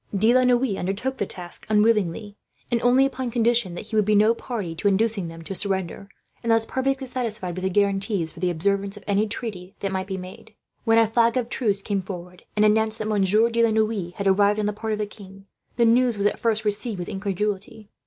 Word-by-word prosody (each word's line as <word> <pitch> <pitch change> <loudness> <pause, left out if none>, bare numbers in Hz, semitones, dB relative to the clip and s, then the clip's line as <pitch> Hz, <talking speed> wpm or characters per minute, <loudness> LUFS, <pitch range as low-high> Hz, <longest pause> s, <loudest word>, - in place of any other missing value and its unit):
De 220 +5 +4
la 255 - +5
Noue 250 -4 +2
undertook 205 +9 -2
the 200 - -2
task 175 -2 -8
unwillingly, 210 -2 +1 0.4
and 235 -1 +1
only 250 +2 +4
upon 260 -2 -3
condition 235 -5 +1
that - - -7
he 220 +1 -6
would 215 - +4
be 210 +1 +2
no 215 +2 +5
party 220 -8 -5
to 165 +5 -1
inducing 205 -2 +1
them 165 0 -9
to 195 - -6
surrender, 190 0 -2 0.3
unless 225 -1 +2
perfectly 270 +2 -1
satisfied 230 -8 -4
with 185 - -5
the 190 - +1
guarantees 195 -3 0
for - - -13
the 180 - +1
observance 200 +4 -1
of - - -12
any 205 +1 +1
treaty 205 -4 -5
that 195 - -2
might 190 0 -2
be 190 -1 -4
made. 185 0 -11 0.3
When 225 -1 +4
a 230 - +6
flag 230 +2 +2
of 245 -2 -1
truce 205 -7 0
came 200 -2 -1
forward, 180 -1 -9
and 210 0 +4
announced 220 +1 +2
that 215 -1 -4
Monsieur 210 +2 +3
de 230 0 +2
la 230 - +4
Noue 215 -5 0
had 200 - -4
arrived 200 +2 +3
on 210 - 0
the 210 - 0
part 220 +1 -4
of - - -1
the 210 - -1
king, 195 -2 -13 0.3
the 235 - +4
news 240 0 +3
was 200 - -1
at 205 - +1
first 220 -2 0
received 210 +1 -1
with 175 - -5
incredulity. 205 +1 -4
210 Hz, 225 wpm, -24 LUFS, 195-230 Hz, 0.4 s, a